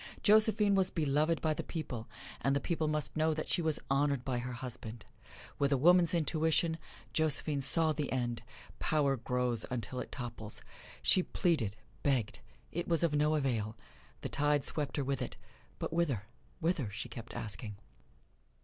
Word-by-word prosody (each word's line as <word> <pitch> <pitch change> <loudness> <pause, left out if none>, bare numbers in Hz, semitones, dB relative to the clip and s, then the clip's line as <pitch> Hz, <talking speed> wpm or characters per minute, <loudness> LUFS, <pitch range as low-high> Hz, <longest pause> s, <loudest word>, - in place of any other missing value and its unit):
Josephine 210 -1 +6
was 190 -1 +3
beloved 155 0 +1
by 155 -1 +2
the - - -3
people, 125 -9 -5 0.3
and 135 0 +2
the - - +2
people 160 +1 -1
must 150 -2 -1
know 155 0 +2
that 155 - -3
she - - +2
was 160 -2 +1
honored 140 -2 +1
by 125 -2 0
her 125 +1 -4
husband. 120 -2 -6 0.5
With 140 0 +2
a 140 - +4
woman's 175 +4 +5
intuition, 160 0 +2 0.3
Josephine 150 -2 +2
saw 160 +3 +3
the 150 -1 -2
end 120 -3 -1 0.4
power 145 -3 +2
grows 125 -1 -1
until 125 0 -3
it - - -6
topples. 115 -4 -4 0.4
She 185 - +5
pleaded, 145 - 0 0.2
begged 130 -7 0 0.3
it 175 +1 -3
was 165 -1 +3
of 165 -3 +2
no 150 +1 +3
avail 115 -7 -1 0.4
the - - -3
tide 145 -1 +2
swept 150 -1 -2
her 145 - +1
with 135 0 -1
it, - - -4 0.4
but - - -4
whither, 150 - +1 0.4
whither? 165 - 0
she 100 - -5
kept 115 -1 -9
asking. 105 0 -4
145 Hz, 165 wpm, -33 LUFS, 125-160 Hz, 0.5 s, Josephine